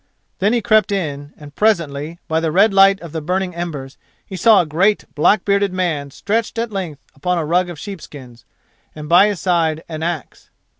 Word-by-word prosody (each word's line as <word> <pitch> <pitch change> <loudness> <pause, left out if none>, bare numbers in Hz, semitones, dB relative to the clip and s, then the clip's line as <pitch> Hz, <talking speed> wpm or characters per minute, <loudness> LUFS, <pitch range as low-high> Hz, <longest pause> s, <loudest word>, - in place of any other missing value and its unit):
Then 200 +3 +2
he 235 -3 0
crept 215 -2 +3
in, 145 -7 -3
and, 145 -1 -13
presently, 165 -7 0
by 160 0 +1
the 165 -1 -1
red 200 +5 +4
light 195 0 +5
of 170 -3 -9
the 160 0 -4
burning 180 +3 -2
embers, 150 -6 -6 0.3
he 190 - -8
saw 215 +4 +5
a - - +2
great 185 +7 +1
black 185 +6 +2
bearded 200 -1 +1
man 170 -6 -2
stretched 220 +10 -2
at 230 0 -2
length 170 -8 -5
upon 180 +6 -2
a 165 - -1
rug 175 +3 +1
of 175 - -8
sheepskins, 145 - -10 0.5
and 150 -1 -8
by 175 +5 +6
his 205 -4 -2
side 165 -3 0
an 155 -1 -6
axe. 165 -3 -5
175 Hz, 195 wpm, -18 LUFS, 155-195 Hz, 0.5 s, by